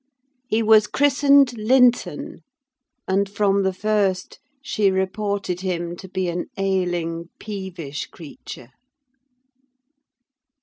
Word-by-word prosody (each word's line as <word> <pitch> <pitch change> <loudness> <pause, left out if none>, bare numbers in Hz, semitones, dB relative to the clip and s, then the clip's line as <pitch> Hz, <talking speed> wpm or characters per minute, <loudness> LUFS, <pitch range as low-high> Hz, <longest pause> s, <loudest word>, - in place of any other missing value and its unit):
He 225 -2 +1
was 215 -1 +5
christened 280 -2 +4
Linton, 245 +2 +2 0.7
and, 195 +1 +1
from 200 -1 +1
the 190 -1 +1
first, 195 -1 -1 0.2
she 215 -6 +1
reported 190 -1 -2
him 175 -2 -3
to 190 - -11
be 185 -1 -2
an 175 +1 -3
ailing, 175 -3 -1
peevish 190 -8 -6
creature. 140 -5 -11
195 Hz, 95 wpm, -22 LUFS, 180-215 Hz, 0.7 s, was